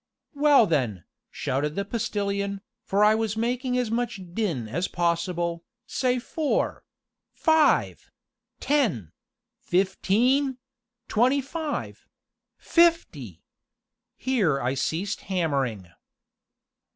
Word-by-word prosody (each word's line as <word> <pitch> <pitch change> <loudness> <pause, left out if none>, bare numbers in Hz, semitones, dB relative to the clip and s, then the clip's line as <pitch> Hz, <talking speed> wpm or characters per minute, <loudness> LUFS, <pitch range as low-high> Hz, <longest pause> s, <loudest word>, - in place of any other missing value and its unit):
"Well 290 -4 +5
then," 125 - -1 0.3
shouted 145 +4 -2
the 200 - -2
Postilion, 200 -2 -2 0.2
for 200 +2 +1
I 210 +1 +6
was 220 -1 -1
making 250 +2 -1
as 245 -3 -1
much 235 -3 -2
din 170 - -2
as 175 +11 -2
possible, 170 0 -1 0.2
"say 255 -1 0
four 295 +4 -1 0.5
five 315 -1 +2 0.5
ten 210 - 0 0.5
fifteen 230 +9 +1 0.5
twenty 255 +6 +3
five 300 +2 -5 0.5
fifty!" 250 - +1 0.7
Here 205 - +1
I 125 +1 -1
ceased 165 +8 -2
hammering. 135 - -1
200 Hz, 90 wpm, -25 LUFS, 165-250 Hz, 0.7 s, I